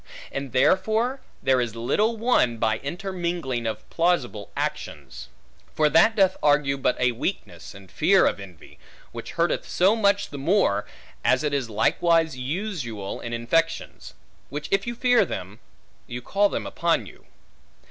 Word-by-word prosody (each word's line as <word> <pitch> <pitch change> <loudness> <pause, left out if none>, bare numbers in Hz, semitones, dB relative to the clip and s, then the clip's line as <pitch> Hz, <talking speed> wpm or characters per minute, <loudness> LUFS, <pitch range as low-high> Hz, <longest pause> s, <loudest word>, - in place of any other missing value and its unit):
And 135 -2 -5
therefore 215 - +2 0.2
there 130 -1 +3
is 115 -2 -3
little 210 - 0
won, 210 - +2
by 110 -1 0
intermingling 170 - -3
of 110 - -5
plausible 150 - 0
actions. - - -5 0.5
For 155 -1 +3
that 220 +7 +5
doth 190 -3 +3
argue 145 -2 +3
but 135 - 0
a 125 -1 +3
weakness, 115 - -5
and 100 -2 -14
fear - - +4
of - - 0
envy, 95 -4 -13 0.3
which - - -8
hurteth - - 0
so 190 +5 +3
much 200 -2 +2
the 145 - -6
more, 135 - +1 0.4
as 130 +2 +2
it 150 -1 -1
is 135 -4 -1
likewise 160 +8 +2
usual 130 - -4
in 120 - -6
infections; 165 +9 -1 0.3
which 145 +1 -5
if 195 +3 +1
you 235 - -3
fear 245 0 +4
them, 95 +3 -6 0.5
you 120 - -5
call 205 +6 +2
them - - -3
upon 165 -9 0
you. - - -15
145 Hz, 150 wpm, -24 LUFS, 120-190 Hz, 0.5 s, that